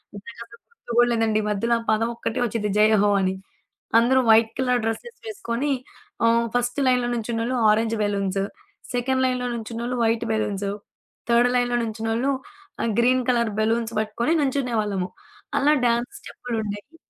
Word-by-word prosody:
నాకు 230 +4 -10
అసలు 235 0 -17
గుర్తు 460 - -12
గూడా 240 0 +5
లేదండి. 225 -2 +1
మధ్యలో 230 +3 +1
ఆ - - -8
పదమొక్కటే 230 +1 -1
ఒచ్చిద్ది 215 -2 -2
జయహో 210 -1 +4
అని. 190 0 0 0.6
అందరూ 260 +3 +3
వైట్ 220 0 +6
కలర్ 250 -2 +1
డ్రస్సెస్ 345 - -4
వేసుకోనీ 285 - -2 0.5
ఆహ్, 230 0 +3
ఫస్ట్ 245 +3 0
లైన్లో 250 -1 +2
నుంచున్నోళ్ళు 235 +2 -2
ఆరెంజ్ 225 +1 +2
బెలూన్సు, 200 -1 -1 0.5
సెకండ్ 260 +2 0
లైన్‌లో 250 -1 -1
నుంచున్నోళ్ళు 235 +2 -4
వైట్ 230 +1 +1
బెలూన్సు, 205 -2 -1 0.6
థర్డ్ 240 +1 +4
లైన్‌లో 245 0 +1
నుంచున్నోళ్ళు 225 +4 -1 0.5
ఆహ్, 230 - 0
గ్రీన్ 255 +1 +3
కలర్ 235 -2 +1
బలూన్స్ 230 +1 0
పట్టుకొని 235 +9 0
నుంచునే 265 -3 -1
వాళ్ళము. 195 -3 -2 0.5
అలా 295 +2 +4
డాన్స్ 235 +1 0
స్టెప్పులుండేవి. 220 +3 -6
235 Hz, 140 wpm, -23 LUFS, 220-245 Hz, 0.6 s, వైట్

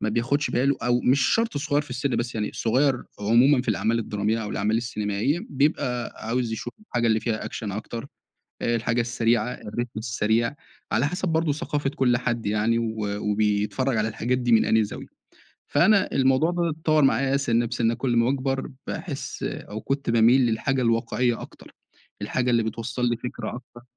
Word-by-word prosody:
ما 110 - -1
بياخدش 120 +6 0
باله، 135 +3 +2
أو 120 0 +2
مش 135 +3 +3
شرط 230 -6 0
صغير 145 0 0
في 145 - -16
السن، 125 +2 -1
بس 120 0 -2
يعني 105 -1 -2
صغير 130 +3 +1 0.2
عمومًا 125 +5 +4
في - - -10
الأعمال 110 +2 +1
الدرامية، 105 +1 -1
أو 105 - -5
الأعمال 105 +2 0
السينمائية، 115 - -1
بيبقى 130 -4 0
عاوز 120 0 -1
يشوف 120 +2 -5
الحاجة 120 - -1
اللي 110 -1 +3
فيها 110 -3 -2
أكشن 105 -3 -5
أكتر، 115 +4 -5 0.6
الحاجة 115 0 +1
السريعة، 120 +1 +1
الريتم 120 +3 -5
السريع، 110 +2 0 0.4
على 120 +5 +2
حسب 180 +3 -2
برضه 160 -2 +1
ثقافة 145 -1 -2
كل 125 -4 +2
حد 120 -2 -2
يعني، 110 +3 +1
و 115 -1 -2 0.2
وبيتفرّج 105 +5 0
على 110 0 +1
الحاجات 120 +3 -1
دي 120 -1 0
من 110 - +5
أنهي 110 -1 +3
زاوية. - - -9 0.5
فأنا 195 +7 +3
الموضوع 135 +5 +3
فضِل 175 -1 0
يتطوّر 155 -1 +2
معايا 135 0 +3
سِنِّة، 120 -3 +1
بسِنِّة 115 0 0
كل 125 +1 -1
أما 115 0 +3
باكبر، 135 +1 -1 0.2
باحس - - -5
أو 110 +1 -5
كنت 135 -3 -2
باميل 120 +3 +5
للحاجة 130 +4 0
الواقعية 115 +1 +1
أكتر، - - -12 0.5
الحاجة 125 -1 -1
اللي 115 -1 +3
بتوصّل 115 +2 -3
لي 120 - 0
فكرة 125 +1 -5
أكتر. 120 -1 -12
120 Hz, 175 wpm, -25 LUFS, 115-135 Hz, 0.6 s, من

